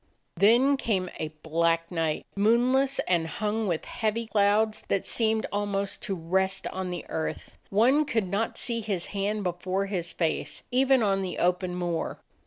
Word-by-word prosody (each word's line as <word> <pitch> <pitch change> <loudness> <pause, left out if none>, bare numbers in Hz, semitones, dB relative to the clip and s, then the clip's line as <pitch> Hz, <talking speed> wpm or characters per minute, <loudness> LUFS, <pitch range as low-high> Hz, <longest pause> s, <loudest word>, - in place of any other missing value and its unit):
Then 240 +9 +5
came 190 -8 -1
a 155 - -1 0.2
black 165 +1 +1
night, 165 -3 -1
moonless, 245 +6 +3
and 170 -3 +2
hung 215 +4 -2
with 170 -4 -1
heavy 225 0 -2
clouds 215 0 +2
that 195 - 0
seemed 220 -1 +1
ahnost 200 -1 -1
to 195 - -2
rest 190 +3 0
on 185 0 -4
the 180 - -5
earth; 160 - -4
one 255 +9 +4
could 225 -8 0
not 200 +5 -1
see 230 -2 -1
his 200 -5 -2
hand 205 +1 -1
before 185 +2 -1
his 180 -4 -3
face, 165 -2 -2
even 260 0 +4
on 195 -2 +2
the 185 -1 -4
open 180 0 +1
moor. 175 -2 -2
200 Hz, 160 wpm, -27 LUFS, 180-220 Hz, 0.2 s, Then